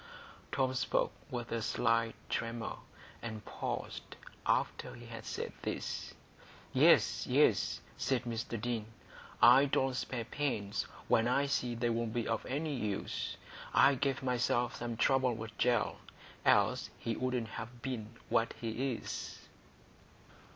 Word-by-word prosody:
Tom 130 -1 +1
spoke 130 - +1 0.2
with 120 -2 -4
a 115 - 0
slight 115 +1 +1
tremor, 115 0 -2 0.4
and 110 -3 -6
paused - - -4 0.3
after - - 0
he 120 - -11
had 115 -1 -8
said - - -4
this. - - -4 0.6
"Yes, - - +5
yes," - - +3 0.2
said 130 -2 +1
Mr 115 -1 -3
Deane. 115 -2 -2 0.6
"I 135 +2 +9
don't 135 -1 +1
spare 125 -2 -3
pains 115 -6 -1 0.2
when 115 +1 +4
I 140 +3 +3
see 125 -3 0
they'll 115 0 0
be 115 0 -2
of 115 -1 0
any 150 +3 -1
use. 105 -6 -2 0.4
I 140 - +7
gave 135 0 0
myself 125 -1 +1
some 120 -1 -4
trouble 130 -1 +3
with 115 0 -7
Gell, 120 -3 +2 0.5
else - - +4
he 115 - -2
wouldn't 125 -2 -1
have 120 +2 -7
been 120 -5 -3 0.2
what 115 +1 +2
he 120 +3 -1
is." - - -5
120 Hz, 130 wpm, -34 LUFS, 115-130 Hz, 0.6 s, I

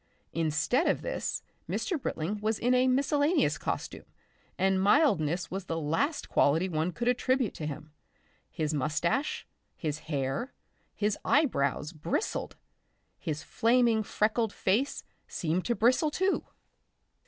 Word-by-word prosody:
Instead 165 - +1
of - - +1
this, - - -3 0.3
Mr. 340 -7 -1
Britling 190 +3 -2
was 215 0 0
in 245 +2 +2
a 255 +1 +4
miscellaneous 285 +5 +2
costume, - - -4 0.5
and 190 0 +2
mildness 180 - +3
was 190 0 -4
the 165 -2 -2
last 220 - -1
quality 160 +6 +3
one 160 0 -1
could 240 +6 -3
attribute 250 -1 +1
to 155 - -5
him. 150 +1 -7 0.6
His 155 0 -2
moustache, 155 - 0 0.3
his 155 -2 -3
hair, 140 - -2 0.4
his 210 0 0
eyebrows 155 - +1
bristled; 165 - -2 0.6
his 155 -3 -4
flaming 235 -1 +3
freckled 215 +1 0
face 225 +9 0 0.2
seemed 165 0 -1
about - - -7
to 240 - +1
bristle 255 +8 +3
too. 375 +6 0
205 Hz, 130 wpm, -29 LUFS, 155-255 Hz, 0.6 s, a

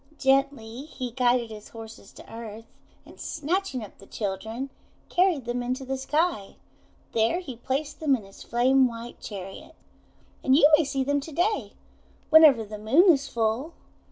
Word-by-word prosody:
Gently 270 -2 +1
he 255 -5 -6
guided 245 -1 +1
his 210 -1 -10
horses 225 -3 -11
to - - -14
earth, 225 -1 -8 0.4
and, - - -16
snatching 315 - -2
up 205 - -12
the 195 - -15
children, 220 +6 -4 0.4
carried 350 -8 +2
them 240 +1 -2
into 255 +2 -3
the 270 +1 -2
sky. 295 - -1 0.6
There 230 +10 +2
he 270 -10 -8
placed 275 +5 -3
them 295 -4 +3
in 230 - -7
his 195 - -15
flame 255 +2 +3
white 235 0 -8
chariot. 195 -2 -8 0.7
And 265 - +4
you 290 0 +7
may 305 0 +1
see 270 -1 -1
them 285 +2 +1
to 290 +3 -8
day, 360 +8 0 0.6
whenever 310 -7 +8
the 210 0 -8
Moon 290 - +5
is 280 -1 -2
full. 235 +8 -1
260 Hz, 160 wpm, -26 LUFS, 225-285 Hz, 0.7 s, whenever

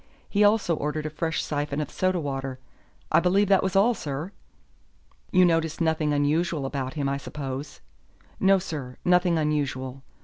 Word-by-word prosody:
He 205 0 +2
also 205 -5 +3
ordered 150 +1 -3
a 155 - -3
fresh 160 +1 -2
syphon 145 -1 -2
of 150 - -3
soda 185 -1 0
water. 135 -3 -4 0.5
I - - +6
believe 190 +4 +2
that 195 -1 +5
was 190 -1 -2
all, 210 +5 +5
sir." 150 -1 -5 1.0
"You 185 -1 +6
noticed 165 -2 +1
nothing 160 -2 +1
unusual 150 +1 +1
about 135 0 -3
him, 145 -2 -1
I 140 0 0
suppose." 140 0 -6 0.6
"No, 195 0 +5
sir, 145 -9 -6
nothing 180 -1 +3
unusual. 135 -4 -1
155 Hz, 160 wpm, -26 LUFS, 140-180 Hz, 1.0 s, I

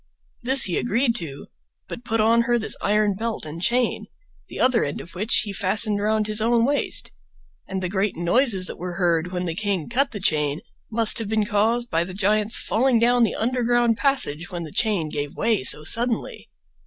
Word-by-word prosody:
This 265 +2 +5
he 180 - +2
agreed 240 +1 0
to, 145 -5 -7 0.4
but 235 - -8
put 225 -1 -2
on 225 +2 +3
her 240 +1 +1
this 220 - 0
iron 210 0 +1
belt 225 0 -4
and 155 +2 -8
chain, 245 +5 0 0.4
the - - -9
other 255 -2 +2
end 145 - -4
of 165 - -11
which 210 +5 +1
he 205 -3 -6
fastened 205 +2 +1
around 215 0 0
his, 215 0 0
own 230 +1 +2
waist, 285 +2 -1 0.6
and 190 -1 -4
the - - -1
great 195 +2 -1
noises 190 +3 +2
that - - -7
were 180 +1 -5
heard 175 -1 0
when 180 -1 -3
the 165 - -3
king 195 -3 -2
cut 270 +4 0
the 210 - -7
chain 150 -4 0 0.3
must 225 0 +5
have 220 -3 -5
been 215 -1 0
caused 230 +3 0
by 165 0 +1
the 185 +1 -9
giant's 210 +2 +1
falling 250 +2 +1
down 240 +2 +2
the 230 - +1
underground 240 0 +1
passage 195 - +1
when 175 -3 -6
the 155 - -9
chain 205 -7 0
gave 145 -1 -5
way 225 -2 +1
so 150 - +3
suddenly. 230 +8 -2
215 Hz, 200 wpm, -22 LUFS, 180-235 Hz, 0.6 s, This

